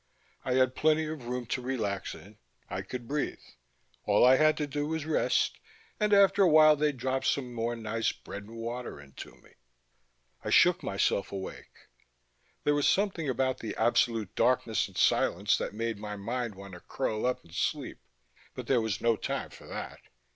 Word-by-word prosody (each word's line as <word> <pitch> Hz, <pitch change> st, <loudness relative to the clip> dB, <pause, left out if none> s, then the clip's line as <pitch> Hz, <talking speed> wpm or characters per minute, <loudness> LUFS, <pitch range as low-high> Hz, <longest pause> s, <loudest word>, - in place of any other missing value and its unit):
I 125 Hz, -, -1 dB
had 130 Hz, -1 st, +3 dB
plenty 155 Hz, +2 st, +2 dB
of 155 Hz, -6 st, -6 dB
room 125 Hz, 0 st, -3 dB
to 125 Hz, +3 st, -3 dB
relax 110 Hz, -7 st, -3 dB
in, 100 Hz, +6 st, -15 dB, 0.3 s
I -, -, -2 dB
could 125 Hz, -2 st, -7 dB
breathe. 145 Hz, +2 st, -2 dB, 0.7 s
All -, -, +4 dB
I 130 Hz, +1 st, +7 dB
had 155 Hz, +1 st, +4 dB
to 150 Hz, -, -1 dB
do 145 Hz, +1 st, -3 dB
was 160 Hz, -1 st, -3 dB
rest, 155 Hz, -, +1 dB, 0.4 s
and 210 Hz, -1 st, +1 dB
after 200 Hz, 0 st, +5 dB
a 185 Hz, -, +6 dB
while 155 Hz, -1 st, +7 dB
they'd 150 Hz, -2 st, 0 dB
drop 130 Hz, +1 st, -1 dB
some 125 Hz, -3 st, -1 dB
more 120 Hz, 0 st, -2 dB
nice 115 Hz, 0 st, -1 dB
bread 100 Hz, +1 st, -9 dB
and 115 Hz, +2 st, -12 dB
water 120 Hz, -4 st, -5 dB
in 70 Hz, -1 st, -14 dB
to -, -, -10 dB
me.... -, -, -22 dB, 0.9 s
I -, -, -3 dB
shook 180 Hz, +1 st, +5 dB
myself 100 Hz, 0 st, 0 dB
awake. 95 Hz, -1 st, -8 dB, 0.8 s
There 145 Hz, -, +3 dB
was 145 Hz, -1 st, +2 dB
something 190 Hz, -7 st, 0 dB
about 130 Hz, 0 st, 0 dB
the 110 Hz, -, -5 dB
absolute 115 Hz, -2 st, +1 dB
darkness 120 Hz, -3 st, +1 dB
and -, -, -13 dB
silence 100 Hz, +5 st, +3 dB
that -, -, -3 dB
made 115 Hz, -1 st, -3 dB
my 105 Hz, 0 st, -5 dB
mind 115 Hz, +2 st, -3 dB
want 100 Hz, 0 st, -11 dB
to 90 Hz, -, -9 dB
curl 110 Hz, +6 st, -2 dB
up 125 Hz, -, -2 dB
and 85 Hz, -, -18 dB
sleep, -, -, -2 dB, 0.6 s
but -, -, -6 dB
there 125 Hz, -3 st, +2 dB
was 110 Hz, -2 st, -2 dB
no 115 Hz, -1 st, +3 dB
time -, -, -4 dB
for -, -, -14 dB
that. -, -, -7 dB
125 Hz, 185 wpm, -29 LUFS, 110-145 Hz, 0.9 s, I